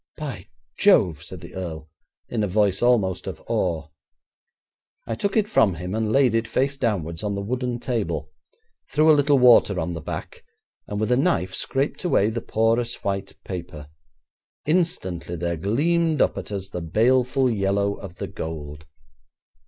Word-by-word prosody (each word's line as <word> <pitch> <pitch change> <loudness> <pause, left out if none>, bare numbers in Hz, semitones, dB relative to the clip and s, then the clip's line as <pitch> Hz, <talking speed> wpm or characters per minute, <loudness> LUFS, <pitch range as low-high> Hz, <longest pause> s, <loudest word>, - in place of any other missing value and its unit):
'By 135 - -6 0.3
Jove!' 90 - +4
said 90 0 -9
the 85 - -11
earl, 80 -4 -6 0.4
in 115 -3 -1
a - - +1
voice 100 0 +1
almost 110 -7 +2
of - - -5
awe. 80 -3 -1 1.2
I - - -3
took 200 - -1
it 210 -1 +3
from 105 - +3
him, 90 +3 -5
and 110 0 0
laid 130 -2 +4
it, 115 0 +1
face 135 +4 0
downwards, 85 - -2
on 105 -1 -2
the 100 - -3
wooden 125 +2 -2
table, 85 - -2 0.6
threw 155 +2 +5
a - - +8
little 145 -1 +4
water 120 -6 +6
on 85 +2 -2
the 85 - -5
back, - - -7 0.4
and 105 - -3
with 110 +3 0
a 125 - +4
knife 95 - +1
scraped 135 +2 -2
away 110 - +2
the 115 +1 -3
porous 115 +2 0
white 100 0 -3
paper. 85 -5 -7 0.8
Instantly 145 - -1
there 85 0 -2
gleamed 155 - +1
up - - +3
at - - -6
us 95 -1 -4
the 90 - -5
baleful 125 - +2
yellow 100 -2 +1
of 95 -3 -9
the - - -5
gold. 75 -2 -7
105 Hz, 165 wpm, -24 LUFS, 90-125 Hz, 1.2 s, a